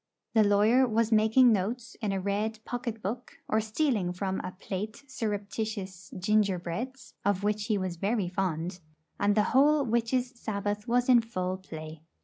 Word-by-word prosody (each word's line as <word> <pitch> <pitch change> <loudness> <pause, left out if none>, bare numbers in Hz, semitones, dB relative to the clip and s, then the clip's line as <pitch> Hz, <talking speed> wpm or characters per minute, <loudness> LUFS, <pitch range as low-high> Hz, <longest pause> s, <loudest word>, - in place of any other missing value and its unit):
the 220 -2 +6
lawyer 215 +6 +4
was 230 0 +1
making 220 +3 +6
notes 225 +4 -2
in 210 -3 0
a 195 - -1
red 205 +3 -1
pocket 240 -3 -4
book, 235 +6 -5
or 220 - +2
stealing 215 - 0
from 190 +1 -2
a - - -5
plate 210 +6 -5
surreptitious 205 -5 -4
gingerbreads, 210 +5 -1
of 200 -1 +1
which 210 0 0
he 215 -3 +2
was 185 -3 -3
very 200 +1 0
fond; 180 -1 -2 0.4
and 205 0 +3
the 210 - +4
whole 290 +2 +5
Witches' 235 +2 0
Sabbath 210 -3 -3
was 245 +1 +2
in 245 -2 +7
full 185 -5 -3
play. 155 -4 -9
210 Hz, 155 wpm, -29 LUFS, 190-235 Hz, 0.4 s, in